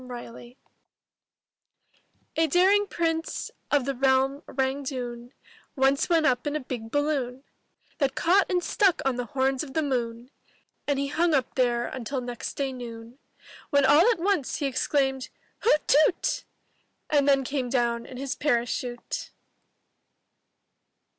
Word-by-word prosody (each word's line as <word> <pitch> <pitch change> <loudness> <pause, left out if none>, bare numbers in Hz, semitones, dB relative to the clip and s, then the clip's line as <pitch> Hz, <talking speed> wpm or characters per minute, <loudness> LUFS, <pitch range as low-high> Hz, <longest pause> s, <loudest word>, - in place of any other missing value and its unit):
THE 255 - -12
DARING 240 -1 -7
PRINCE* 240 +1 -13 1.8
A 325 0 +3
daring 385 +6 +4
Prince, 325 -2 -2 0.2
of 285 -3 +2
the 275 - -1
realm 265 +2 +2
Rangg 265 +1 -2
Dhune, 245 -2 -5 0.4
Once 270 +2 +2
went 330 -2 +3
up 250 +1 +1
in 290 - -1
a - - 0
big 245 -4 -6
balloon 275 -2 -1 0.6
That 275 -3 +1
caught 375 +4 +3
and 360 -2 +1
stuck 390 -5 +2
on 265 -2 +1
the 245 - -2
horns 265 0 0
of 275 -3 -10
the 315 - +2
moon, 240 -2 -3 0.6
And 285 -1 +1
he 280 0 -1
hung 330 +1 +2
up 260 -3 0
there 240 -2 +1
until 260 +2 -4
next 245 -1 -5
day 275 -2 -2
noon 235 0 -9 0.3
— - - -19
When 285 -3 +4
all 325 - +6
at 470 - +2
once 350 -5 0
he 290 - -2
exclaimed, 270 0 0 0.3
''Hoot 305 -9 +2
toot 305 +5 +4
T* - - -1 0.7
And 290 -2 +3
then 275 -1 +4
came 260 -1 -2
down 235 -2 0
in 255 - -9
his 270 0 -3
parachute. 240 -2 -2
270 Hz, 155 wpm, -26 LUFS, 245-300 Hz, 1.8 s, all